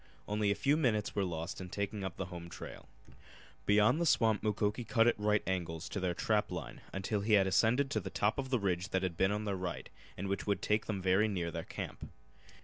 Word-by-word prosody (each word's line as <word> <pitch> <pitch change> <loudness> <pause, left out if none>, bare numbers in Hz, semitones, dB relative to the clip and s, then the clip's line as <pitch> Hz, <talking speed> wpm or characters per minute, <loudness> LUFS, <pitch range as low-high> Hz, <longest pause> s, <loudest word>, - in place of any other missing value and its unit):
Only 105 0 +1
a 100 - +2
few 145 +7 +2
minutes 110 -9 +1
were 100 - +1
lost 85 +1 -4
in 90 - -7
taking 100 +1 -3
up 95 -3 -4
the 95 - -2
home 85 -1 -7
trail. 90 - -9 0.8
Beyond 105 +10 +4
the 170 - +2
swamp 110 -7 +3
Mukoki 105 +2 0
cut 115 0 +3
at 120 -2 +3
right 105 0 +2
angles 85 -3 -2
to - - -3
their 90 -2 -1
trap - - +1
line - - -6
until 100 +2 -1
he 110 +2 +1
had 100 -2 +6
ascended 115 +8 +3
to - - +1
the - - -5
top 105 +6 0
of 130 -1 -3
the 130 - +2
ridge 95 -2 -1
that 95 0 0
had 90 -2 -1
been 95 +3 +2
on 105 +1 -2
their 100 -2 -1
right 90 -2 -5 0.3
and 100 - -3
which 100 +2 -2
would 100 -2 0
take 105 +1 +1
them 100 -4 -2
very 95 +3 +4
near 90 -5 -2
their - - -5
camp. - - -6
100 Hz, 235 wpm, -33 LUFS, 95-110 Hz, 0.8 s, had